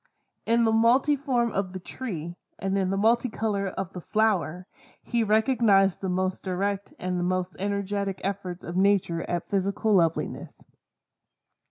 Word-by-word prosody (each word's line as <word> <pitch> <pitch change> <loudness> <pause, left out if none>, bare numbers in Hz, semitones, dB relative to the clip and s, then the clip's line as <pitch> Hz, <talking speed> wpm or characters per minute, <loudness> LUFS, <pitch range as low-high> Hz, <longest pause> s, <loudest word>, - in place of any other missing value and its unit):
In 230 0 +4
the 225 - +3
multiform 245 +1 +3
of 190 -2 -2
the 185 - -5
tree, 175 -5 -6 0.2
and 195 0 -2
in 190 -2 +1
the 195 - 0
multicolor 220 -2 +1
of 190 -1 -5
the 180 - -6
flower, 185 -5 0 0.4
he 235 -2 0
recognized 215 -3 +3
the 190 - -2
most 185 +1 -1
direct 195 +2 -2
and 180 0 -2
the - - -1
most 185 0 -1
energetic 200 0 -2
efforts 190 -2 -4
of 170 - -6
Nature 190 -3 +2
at 175 -1 -2
physical 200 +2 0
loveliness. 165 -4 0
195 Hz, 145 wpm, -26 LUFS, 185-220 Hz, 0.4 s, In